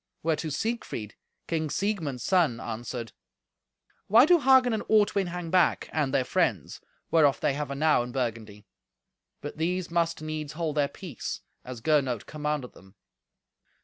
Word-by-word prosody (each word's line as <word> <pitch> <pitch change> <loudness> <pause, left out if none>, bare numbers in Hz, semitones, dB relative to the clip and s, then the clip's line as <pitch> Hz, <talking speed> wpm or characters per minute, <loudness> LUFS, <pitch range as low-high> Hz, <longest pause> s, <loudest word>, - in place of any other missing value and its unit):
Whereto 160 0 0
Siegfried, 150 - -3 0.3
King 160 -2 -2
Siegmund's 165 - -2
son, 165 -11 +2
answered, 115 0 -5 1.0
"Why 230 +6 +7
do 345 +2 +5
Hagen 260 -3 +5
and 220 - -1
Ortwin 205 -3 +3
hang 175 -1 -5
back, 180 -2 +2
and 150 -4 0
their 130 - +2
friends, - - -1 0.3
whereof 150 -4 +4
they - - +1
have 145 0 -4
enow 150 0 +2
in 120 +1 -5
Burgundy?" 110 -5 -4 0.8
But 145 - -7
these 175 +2 -1
must 170 -1 0
needs 155 -1 -4
hold 160 -2 -3
their 145 -1 +3
peace, 160 - -7 0.2
as 125 -2 -8
Gernot 135 -6 +1
commanded 150 -4 -3
them. 95 +1 -18
155 Hz, 145 wpm, -27 LUFS, 130-175 Hz, 1.0 s, Why